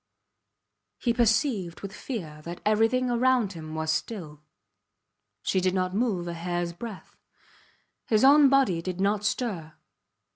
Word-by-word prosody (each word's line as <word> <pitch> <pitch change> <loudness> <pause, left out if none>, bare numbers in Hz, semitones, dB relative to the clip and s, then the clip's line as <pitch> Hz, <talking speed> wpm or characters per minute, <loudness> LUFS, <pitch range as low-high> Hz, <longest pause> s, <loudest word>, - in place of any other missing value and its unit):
He 235 - 0
perceived 225 - +1
with 195 -1 -7
fear 160 - -6
that 170 +2 -7
everything 225 +4 +2
around 240 -4 +2
him 155 -2 -8
was 160 0 -1
still. 160 -4 -4 1.0
She 190 - +1
did 185 0 +1
not 185 0 0
move 200 -5 0
a 170 - -3
hairs 175 0 -3
breadth; 210 +2 -9 0.9
his 215 0 +3
own 285 +1 +7
body 260 -11 +3
did 185 +1 -5
not 200 +1 +1
stir. 195 -8 -2
195 Hz, 135 wpm, -27 LUFS, 170-235 Hz, 1.0 s, own